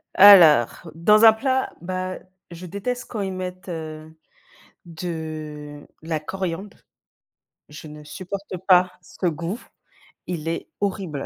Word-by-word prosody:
Alors, 170 - +7
dans 210 +7 +5
un 220 - +9
plat, 260 +3 -1
bah, 185 +1 -4 0.3
je 170 +2 -9
déteste 245 +7 -4
quand 220 - -4
ils 190 -1 -3
mettent, 185 0 -6
heu, 155 -1 -7 0.7
de 155 -3 -7 0.2
la 160 -1 -2
coriandre. 190 +4 -5 0.9
Je 150 +1 -10
ne 150 0 -11
supporte 185 +5 -7
pas 180 -1 +5
ce 180 - -7
goût, 170 +6 -3 0.7
il 165 -3 -5
est 165 - -3
horrible. 185 -8 -3
175 Hz, 125 wpm, -23 LUFS, 155-195 Hz, 0.9 s, un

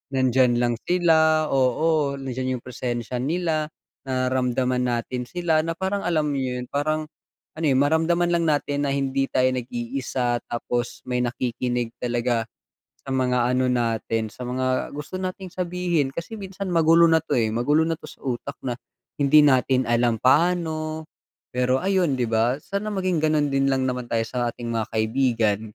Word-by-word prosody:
nandiyan 130 -1 +3
lang 120 -1 +1
sila 160 -3 +3
oo 140 +3 +2
nandiyan 130 -1 -3
yung - - -27
presensya 125 -1 -4
nila, 155 +2 -1 0.4
nararamdaman 130 -1 0
natin 125 +1 -2
sila 175 -3 +1
na 165 - -1
parang 190 +3 -2
alam 155 -3 +1
niyo 130 -2 -2
'yun 125 - -6
parang, 155 +2 -1 0.5
ano 160 - -1
yung 135 0 +3
maramdaman 165 +3 +2
lang 170 -1 +2
natin 145 -1 0
na 135 - 0
hindi 135 0 0
tayo 130 0 +2
nag-iisa 125 0 -2
tapos 120 +1 -3
may 125 -1 -2
nakikinig 120 -1 -2
talaga, 120 -1 -1 0.6
sa 135 - -2
mga 125 -1 +1
ano 130 0 +2
natin 115 -2 0
sa 125 - -11
mga 130 +1 -1
gusto 150 +4 -8
nating 185 0 -4
sabihin 175 -5 -1
kasi 170 +9 -6
minsan 195 -1 -6
magulo 165 +1 +6
na 160 -1 +3
'to, - - -5
eh, 110 -1 +2
magulo 150 +7 +2
na 165 - +1
'to - - -12
sa - - -15
utak 130 +2 -3
na, 120 - -1 0.5
hindi 145 +2 +6
natin 130 -1 +3
alam 120 -1 +2
paano, 155 +1 +1 0.5
pero 125 +1 +2
ayun 185 -6 +2
'di 120 - +1
ba 115 +4 +1
sana 200 +2 -3
maging 185 -5 0
gano'n 155 -1 +2
din 135 0 +2
lang 130 -1 +1
naman 125 -1 -3
tayo 115 -1 +1
sa 120 0 -1
ating 120 0 -7
mga 110 -1 -1
kaibigan. 110 -2 +1
130 Hz, 165 wpm, -24 LUFS, 125-160 Hz, 0.6 s, magulo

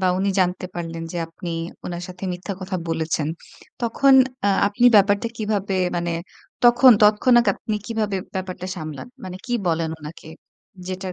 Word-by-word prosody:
বা 185 - +1
উনি 200 +1 0
জানতে 180 0 0
পারলেন 165 -1 -5
যে - - -5
আপনি 165 +1 -9 0.4
উনার 175 0 -5
সাথে 185 +1 -8
মিথ্যা 180 +3 -5
কথা 185 0 -3
বলেছেন। 160 -2 -1 0.5
তখন 265 +4 +4 0.3
আ 205 - +4 0.2
আপনি 205 +4 0
ব্যাপারটা 205 +3 +3
কিভাবে 205 -3 -1 0.2
মানে 175 0 -1 0.5
তখন 240 +2 +7
তৎক্ষণাৎ 235 +3 +5
আপনি 215 - -4
কিভাবে 215 -4 -1 0.2
ব্যাপারটা 185 -1 -5
সামলান? 155 - -7 0.2
মানে 185 0 -6
কী 245 - -4
বলেন 165 -1 0
উনাকে 150 +1 -10 0.6
যেটার 185 0 -5
185 Hz, 150 wpm, -22 LUFS, 175-210 Hz, 0.6 s, তখন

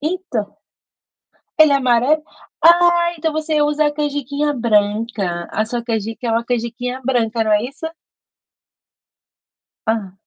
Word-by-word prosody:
Então, 305 - -3 1.0
ele 310 -2 +6
é 280 - +5
amarelo? 255 +4 +2 0.4
Ah, 345 0 +5
então 320 0 -1
você 310 -1 0
usa 295 +1 +2
a 295 - 0
canjiquinha 290 0 -1
branca, 210 -6 0
a 215 - 0
sua 235 +1 -4
canjica 225 +1 -3
é 225 - 0
uma 230 +1 0
canjiquinha 245 +1 -3
branca, 230 -3 0
não 215 - +1
é 210 +1 +3
isso? 275 +6 -6 2.0
Hã. 215 -4 -1
250 Hz, 130 wpm, -19 LUFS, 225-300 Hz, 2.0 s, ele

